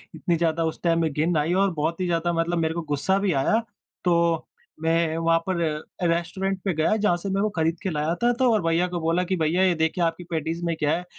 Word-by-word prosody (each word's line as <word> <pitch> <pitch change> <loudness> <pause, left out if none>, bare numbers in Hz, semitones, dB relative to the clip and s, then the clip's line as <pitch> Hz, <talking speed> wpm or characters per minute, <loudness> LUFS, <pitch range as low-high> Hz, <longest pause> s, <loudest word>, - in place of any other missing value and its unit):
इतनी 170 - 0
ज़्यादा 165 0 +1
उस 160 - -4
टाइम 165 -1 +2
में 160 -2 0
घिन्न 160 +2 +1
आई 155 +4 +1
और 195 0 +2
बहुत 160 +3 -2
ही - - +1
ज़्यादा 170 0 0
मतलब 170 +1 0
मेरे 160 -1 0
को 170 - -3
गुस्सा 190 +8 +1
भी 195 -2 +1
आया, 215 +12 +2 0.4
तो 170 -2 +2 0.4
मैं 165 0 +1
वहाँ 165 0 +3
पर 185 - 0 0.5
रेस्टोरेंट 185 +3 -1
पे 190 -3 0
गया, 160 +7 +2
जहाँ 205 -5 +2
से 195 +3 -5
मे 195 +1 0
वो 215 - +1
खरीद 165 -3 -1
के 190 - -1
लाया 155 0 -1
था 240 - +5
तो 255 -2 +4
और 210 - +2
भैया 165 +2 +2
को 175 -1 -3
बोला 165 +3 +1
कि 190 - +2
भैया 170 +3 +1
ये 185 -2 +4
देखिए 160 +2 0
आपकी 165 +1 -1
पैटीज़ 165 +2 -2
में 165 -1 0
क्या 150 -1 +1
है - - -5
अ, - - -14
170 Hz, 250 wpm, -24 LUFS, 160-180 Hz, 0.5 s, था